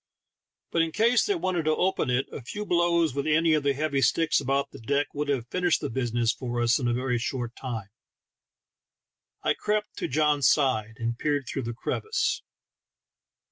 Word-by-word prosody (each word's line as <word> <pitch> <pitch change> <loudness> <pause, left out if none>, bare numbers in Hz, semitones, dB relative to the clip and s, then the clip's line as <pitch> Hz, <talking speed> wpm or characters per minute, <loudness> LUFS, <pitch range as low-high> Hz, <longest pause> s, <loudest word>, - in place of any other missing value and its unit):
But 170 - +2
in 165 0 0
case 235 +6 +3
they 405 - +2
wanted 185 - -1
to 155 0 +3
open 185 -6 0
it, 125 +2 +1
a - - -6
few 210 - -6
blows 170 -4 +2
with 140 +2 -2
any 160 +1 +3
of 155 - +3
the 140 -1 +1
heavy 140 -1 0
sticks 160 +5 +3
about 140 +1 0
the 140 - -11
deck 140 +5 -1
would 150 0 -2
have 135 -5 0
finished 180 -2 +2
the - - -4
business 120 -1 0
for 120 -1 -4
us 120 +2 +3
in 125 - -1
a 120 - +1
very 125 -1 0
short 120 0 -3
time. 115 -6 -5 1.5
I - - +3
crept 210 0 -2
to - - -2
John's 150 -2 +2
side, 115 -7 +1
and 115 +1 -3
peered 145 -2 0
through 135 - -3
the 120 0 -4
crevice. 435 - -1
140 Hz, 185 wpm, -27 LUFS, 120-165 Hz, 1.5 s, case